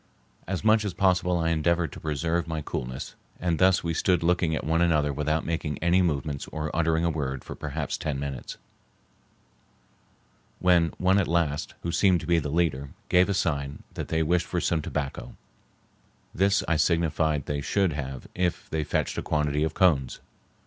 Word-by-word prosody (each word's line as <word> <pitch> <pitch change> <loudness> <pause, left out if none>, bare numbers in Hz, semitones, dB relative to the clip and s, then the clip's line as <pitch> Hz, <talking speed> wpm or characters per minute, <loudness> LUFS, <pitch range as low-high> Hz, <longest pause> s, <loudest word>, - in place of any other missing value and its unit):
As 95 +1 -3
much 110 0 +4
as 100 -4 -3
possible 90 -1 +2
I 85 0 +1
endeavored 85 +1 +1
to - - -9
preserve 80 +3 -1
my 80 -2 -3
coolness, 65 -1 -5 0.3
and 85 -2 0
thus 95 0 +4
we 85 -1 -1
stood 90 +1 +1
looking 85 -2 +2
at - - -3
one 80 +2 +1
another 75 -4 +2
without 75 +2 -1
making 80 -3 -2
any 85 +2 +3
movement 75 -4 -1
or 80 -1 -4
uttering 80 0 +2
a 85 - +2
word 70 -4 -3
for - - -7
perhaps 75 -1 -4
ten 75 -3 -2
minutes, 70 -3 -5 2.0
when 85 -2 +4
one 95 +2 +3
at 95 - +1
last, 80 -3 0
who 85 - -2
seemed 90 0 +3
to - - -7
be 85 -1 +3
the 75 - -4
leader, 70 -4 0 0.2
gave 90 +2 +4
a 100 - +1
sign 70 -6 -2
that - - -5
they 80 0 +1
wished 85 +1 +1
for 90 - -1
some 85 -1 0
tobacco; 75 -2 -4 1.0
this 100 +2 +2
I 80 - +2
signified 80 -3 +1
they 70 -1 -2
should 95 +2 +1
have 65 -3 -5
if 90 -1 -1
they 80 -1 0
fetched - - -1
a - - -2
quantity 75 -1 0
of 80 0 -2
cones. 75 -10 +2
80 Hz, 180 wpm, -26 LUFS, 75-85 Hz, 2.0 s, much